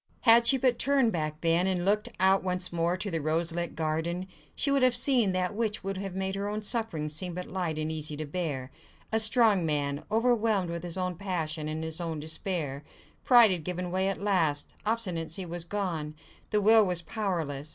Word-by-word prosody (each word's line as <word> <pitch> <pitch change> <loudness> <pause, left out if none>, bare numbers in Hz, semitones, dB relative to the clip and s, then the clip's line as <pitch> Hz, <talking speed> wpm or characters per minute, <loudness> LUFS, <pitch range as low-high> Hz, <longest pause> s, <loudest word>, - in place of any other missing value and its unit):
Had 235 0 +6
she 270 - +6
but 250 -2 +1
turned 270 -4 +3
back 155 -3 -4
then, 170 +2 +2
and 180 -2 -1
looked 210 +2 +1
out 190 +1 +4
once 180 -1 +1
more 170 +1 0
on - - -3
to 200 +1 -4
the 165 -1 -2
rose 160 +3 0
lit 170 0 -4
garden, 160 +3 -2 0.3
she 280 - +1
would 275 -1 +2
have 255 -1 +4
seen 240 -5 +2
that 185 +1 -1
which 215 0 -2
would 195 0 -4
have 195 -1 -6
made 190 0 -2
her 200 +1 -3
own 210 +1 -4
sufferings 200 -10 -1
seem 175 +2 -2
but 180 0 -5
light 175 -4 -3
and 155 0 -2
easy 155 -1 -2
to 155 - -4
bear—a 150 +6 -5
strong 220 -4 +6
man, 145 -2 -2
overwhelmed 220 -5 +1
with 170 0 -5
his 175 0 -4
own 180 -1 -2
passion 165 -5 -3
and 155 +1 -4
his 160 +2 -3
own 165 -2 -4
despair. 155 -2 -3 0.4
Pride 240 -5 +7
had 175 -4 -2
given 180 +1 -4
way 190 +1 0
at 195 - -2
last, 170 -8 0
obstinacy 185 -6 -1
was 175 0 -3
gone: 170 -6 -4 0.3
the 210 -1 +1
will 220 +2 +6
was 180 -3 -1
powerless. 160 -7 -3
180 Hz, 205 wpm, -28 LUFS, 160-210 Hz, 0.4 s, Pride